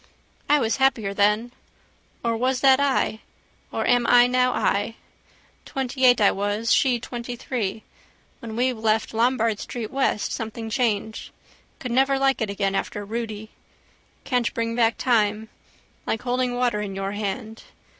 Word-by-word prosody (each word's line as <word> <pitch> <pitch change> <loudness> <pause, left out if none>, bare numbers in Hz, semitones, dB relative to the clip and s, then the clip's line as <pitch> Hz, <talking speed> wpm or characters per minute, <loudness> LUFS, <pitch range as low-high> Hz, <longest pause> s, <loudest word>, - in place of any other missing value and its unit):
I 295 - +6
was 225 -2 0
happier 240 -7 +1
then. 210 +4 +2 0.7
Or 230 -1 0
was 255 +2 0
that 265 -1 +6
I? 275 -5 +1 0.5
Or - - -2
am 245 -1 +3
I 245 0 +7
now 250 0 +2
I? 205 0 0 0.7
Twentyeight 255 -2 +2
I 205 - +5
was. 205 +3 0
She 250 -3 +3
twentythree. 235 -3 -4 0.6
When 225 -1 -7
we 250 +2 +1
left 220 -1 0
Lombard 230 -2 +1
street 230 -3 -6
west 265 -6 0
something 225 0 -5
changed. 220 -3 -1 0.5
Could 250 - -6
never 270 +2 +3
like 270 -1 +1
it 220 - -1
again 200 -1 -1
after 205 +1 -3
Rudy. 220 -1 -5 0.7
Can't 245 -3 0
bring 230 0 -1
back 230 -1 +2
time. 220 -3 +1 0.6
Like 225 - -2
holding 250 0 0
water 245 -4 0
in 200 -2 -5
your 195 0 -3
hand. 210 +2 -4
230 Hz, 145 wpm, -24 LUFS, 215-250 Hz, 0.7 s, I